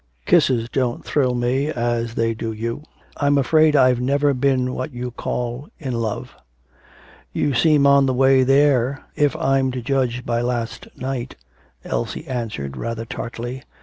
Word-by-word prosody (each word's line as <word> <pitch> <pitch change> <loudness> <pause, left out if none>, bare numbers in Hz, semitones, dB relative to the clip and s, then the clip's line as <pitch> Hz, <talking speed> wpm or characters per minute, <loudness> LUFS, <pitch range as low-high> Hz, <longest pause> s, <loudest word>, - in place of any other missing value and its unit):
Kisses 115 -3 +3
don't 125 -1 -2
thrill 130 -4 +1
me 125 +4 0
as 120 -4 -1
they 115 0 +1
do 115 0 -4
you. 115 +4 -4 0.4
I'm 145 0 +2
afraid 155 +3 +4
I've 130 -3 +4
never 140 +2 +2
been 130 -1 +1
what 130 +4 -4
you 125 0 -4
call 120 +3 -4
"in 130 -5 -4
love."' 115 -3 -3 1.0
'You 145 - 0
seem 145 +3 +4
on 140 -1 +5
the 130 - +1
way 135 +1 +5
there, 135 -1 +3
if 145 -2 +2
I'm 135 0 +1
to 130 - -4
judge 125 -2 -1
by 120 0 0
last 120 -2 -3
night,' 130 -1 -4 0.5
Elsie - - -3
answered 105 - -4
rather 115 - -4
tartly. 120 +2 -6
125 Hz, 150 wpm, -21 LUFS, 120-135 Hz, 1.0 s, on